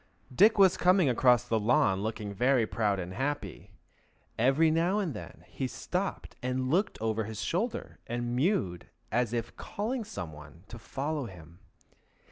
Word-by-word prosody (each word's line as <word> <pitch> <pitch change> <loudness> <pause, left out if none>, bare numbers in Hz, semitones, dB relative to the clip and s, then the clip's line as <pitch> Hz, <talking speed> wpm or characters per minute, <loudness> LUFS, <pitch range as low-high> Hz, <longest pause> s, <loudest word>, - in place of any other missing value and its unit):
Dick 210 - +5
was 190 -2 +6
coming 180 -4 +4
across 125 -1 +4
the 115 - +1
lawn 110 -3 +3
looking 105 -1 -4
very 125 +3 +3
proud 105 -2 0
and 90 0 -5
very 110 +8 -3
happy. 140 - -4 0.6
Every 135 +7 +3
now 170 +5 +2
and 190 -8 -1
then 105 - -10
he 130 - -4
stopped 180 +8 -4
and 130 +1 -1
looked 190 +6 +1
over 110 -1 -1
his 110 0 -6
shoulder 210 - -2
and 120 0 -2
mewed 125 - 0 0.2
as 120 0 +1
if 115 -1 -2
he - - -18
were - - -12
calling 230 +4 -3
some 90 - -7
one 75 +3 -13
to 120 - -9
follow 145 +2 -3
him. 85 -2 -13
125 Hz, 170 wpm, -30 LUFS, 105-165 Hz, 0.6 s, was